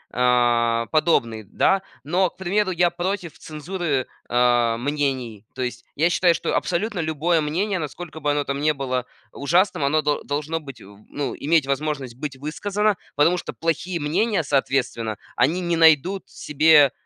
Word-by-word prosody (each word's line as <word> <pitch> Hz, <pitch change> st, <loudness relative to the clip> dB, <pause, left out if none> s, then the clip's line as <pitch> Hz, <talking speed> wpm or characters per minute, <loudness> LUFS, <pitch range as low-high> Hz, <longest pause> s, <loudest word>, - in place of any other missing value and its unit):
а, 120 Hz, -2 st, +2 dB
подобный, 115 Hz, -9 st, +1 dB
да. 195 Hz, -, +1 dB, 0.2 s
Но, 180 Hz, +6 st, +1 dB
к -, -, -32 dB
примеру, 190 Hz, +2 st, 0 dB
я 175 Hz, 0 st, +3 dB
против 175 Hz, -1 st, -3 dB
цензуры, 155 Hz, -3 st, -3 dB, 0.2 s
э, 120 Hz, -1 st, +3 dB
мнений. 130 Hz, -5 st, -2 dB
То 130 Hz, -, -3 dB
есть 125 Hz, -, -5 dB
я 165 Hz, +4 st, +3 dB
считаю, 175 Hz, -1 st, +3 dB
что -, -, -2 dB
абсолютно 190 Hz, +2 st, -1 dB
любое 160 Hz, +1 st, +1 dB
мнение, 185 Hz, +6 st, -1 dB
насколько 160 Hz, +1 st, -7 dB
бы 145 Hz, -1 st, -1 dB
оно 145 Hz, 0 st, 0 dB
там 140 Hz, 0 st, -3 dB
не 155 Hz, +1 st, +3 dB
было 130 Hz, -2 st, -2 dB, 0.3 s
ужасным, 170 Hz, +3 st, +1 dB
оно 150 Hz, +3 st, +2 dB
дол 145 Hz, 0 st, 0 dB
должно 150 Hz, +3 st, -2 dB
быть 135 Hz, -7 st, -11 dB
в 100 Hz, +1 st, -14 dB
ну, 145 Hz, -1 st, -3 dB
иметь 155 Hz, 0 st, +2 dB
возможность 140 Hz, -3 st, -2 dB
быть 135 Hz, 0 st, -6 dB
высказано, 205 Hz, +8 st, -1 dB, 0.2 s
потому 165 Hz, +5 st, +3 dB
что -, -, -6 dB
плохие 165 Hz, +1 st, -2 dB
мнения, 170 Hz, +5 st, 0 dB
соответственно, 130 Hz, -5 st, -1 dB, 0.2 s
они 155 Hz, +9 st, +2 dB
не 170 Hz, -1 st, 0 dB
найдут 165 Hz, +4 st, +4 dB
себе 150 Hz, -1 st, +4 dB
150 Hz, 160 wpm, -23 LUFS, 130-175 Hz, 0.3 s, найдут